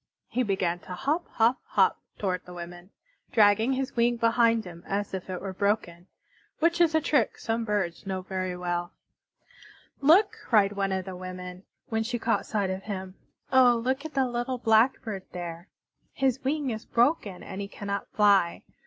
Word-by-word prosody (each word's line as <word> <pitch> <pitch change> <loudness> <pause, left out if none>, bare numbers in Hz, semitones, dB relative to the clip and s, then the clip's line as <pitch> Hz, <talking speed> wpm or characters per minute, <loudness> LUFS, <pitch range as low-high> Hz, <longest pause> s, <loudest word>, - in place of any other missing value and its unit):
He 255 - 0
began 190 -6 0
to 180 - -9
hop, 290 - -1
hop, 235 +3 +3
hop - - +2 0.2
toward 185 -3 -2
the 180 - -11
women, 175 +1 -9 0.4
dragging 220 +3 +4
his 265 0 -3
wing 240 0 +2
behind 230 -1 +3
him 170 -1 -10
as 200 0 -2
if 190 0 -5
it 185 -1 -3
were 195 -1 -5
broken, 190 -3 -1 0.5
which 340 +2 +2
is 325 -2 +4
a 315 - +4
trick 285 -6 +1
some 225 0 -2
birds 195 -4 -2
know 190 -1 -3
very 185 -1 -3
well. 175 -1 -3 1.1
"Look!" 360 +9 +5
cried 205 -4 +3
one 195 -1 -1
of 190 -1 -2
the 190 -1 -6
women, 180 0 -8 0.2
when 225 -1 0
she 240 +2 -2
caught 230 0 0
sight 200 -3 0
of 190 0 -4
him. 190 -3 -5 0.4
"Oh, 255 -2 +7
look 260 +4 -1
at 315 -2 -8
the 270 -1 +3
little 245 +1 -2
Blackbird 220 -3 +2
there! 175 0 -6 0.5
His 265 -2 0
wing 280 -1 0
is 220 0 -5
broken 235 - +1
and 195 - -6
he 200 - -4
cannot 200 0 -4
fly. 200 -5 +3
205 Hz, 175 wpm, -27 LUFS, 185-245 Hz, 1.1 s, Oh